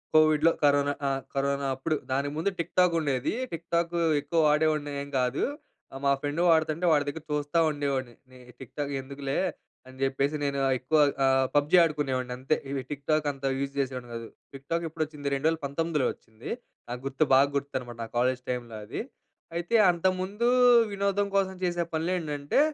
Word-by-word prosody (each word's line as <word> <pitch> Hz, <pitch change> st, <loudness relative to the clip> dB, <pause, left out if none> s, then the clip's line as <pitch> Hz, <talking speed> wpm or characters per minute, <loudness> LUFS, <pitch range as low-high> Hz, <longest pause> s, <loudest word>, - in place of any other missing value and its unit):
కోవిడ్‌లో 155 Hz, +1 st, +5 dB
కరోనా 145 Hz, 0 st, +4 dB
ఆ! -, -, +2 dB, 0.2 s
కరోనా 140 Hz, 0 st, 0 dB
అప్పుడు. 155 Hz, +4 st, -1 dB, 0.2 s
దానికి 140 Hz, +2 st, 0 dB
ముందు 195 Hz, +5 st, 0 dB
టిక్ 170 Hz, -, -4 dB
టాక్ 180 Hz, -2 st, +4 dB
ఉండేది. 135 Hz, -4 st, -1 dB, 0.2 s
టిక్ 165 Hz, 0 st, -6 dB
టాక్ 170 Hz, 0 st, 0 dB, 0.3 s
ఎక్కువ 160 Hz, +3 st, -1 dB
వాడేవాడిని 150 Hz, -1 st, +1 dB
ఏం 140 Hz, -, -10 dB
గాదు. 125 Hz, +2 st, 0 dB, 0.6 s
మా 140 Hz, -, +4 dB
ఫ్రెండ్ 145 Hz, +3 st, -1 dB
వాడుతుంటే 160 Hz, +2 st, +2 dB
వాడి 145 Hz, -1 st, +2 dB
దగ్గర 150 Hz, +2 st, -4 dB
చూస్తా 150 Hz, +2 st, 0 dB
ఉండేవాడిని. 135 Hz, -4 st, -2 dB, 0.2 s
నేను 125 Hz, -1 st, -15 dB
టిక్ 130 Hz, -, -11 dB
టాక్ 145 Hz, -1 st, -2 dB
ఎందుకులే 140 Hz, 0 st, -3 dB, 0.5 s
అని 130 Hz, -, -13 dB
జెప్పేసి, 135 Hz, +2 st, +1 dB
నేను 140 Hz, -1 st, -1 dB
ఆహ్, 135 Hz, -, +3 dB
ఎక్కువ 145 Hz, +5 st, +1 dB, 0.3 s
ఆహ్, 135 Hz, 0 st, +4 dB
పబ్జీ 145 Hz, +3 st, +4 dB
ఆడుకునేవాడిని 135 Hz, -6 st, -1 dB
అంతే. 135 Hz, +4 st, +1 dB
ఇవి 135 Hz, -1 st, -2 dB
టిక్ 140 Hz, -1 st, -6 dB
టాక్ 155 Hz, -1 st, +2 dB
అంత 135 Hz, 0 st, -8 dB
యూజ్ 140 Hz, 0 st, -2 dB
చేసేవాడిని 130 Hz, -2 st, -3 dB
గాదు. 115 Hz, -1 st, -6 dB, 0.3 s
Tick 135 Hz, 0 st, -11 dB
talk 170 Hz, 0 st, +1 dB
ఎప్పుడొచ్చింది? 155 Hz, -2 st, -4 dB
2019 155 Hz, +2 st, 0 dB
లో -, -, +3 dB
వచ్చింది. 110 Hz, +1 st, -12 dB, 0.4 s
నాకు 125 Hz, +1 st, -5 dB
గుర్తు, 135 Hz, +2 st, +1 dB
బాగా 135 Hz, +2 st, +6 dB
గుర్తునమాట, 130 Hz, -4 st, -3 dB
నా 115 Hz, -, -6 dB
కాలేజ్ 125 Hz, +1 st, +1 dB
టైమ్‌లో 120 Hz, -2 st, -4 dB
అది. -, -, -4 dB, 0.5 s
అయితే 175 Hz, +6 st, -1 dB, 0.2 s
అంతకు 185 Hz, +2 st, +1 dB
ముందు 205 Hz, +5 st, -1 dB, 0.4 s
వినోదం 200 Hz, 0 st, 0 dB
కోసం 190 Hz, -1 st, +1 dB
చేసే 175 Hz, -1 st, 0 dB
పనులు 160 Hz, +3 st, 0 dB
ఏంటంటే, 150 Hz, -, -1 dB
145 Hz, 170 wpm, -28 LUFS, 135-160 Hz, 0.6 s, బాగా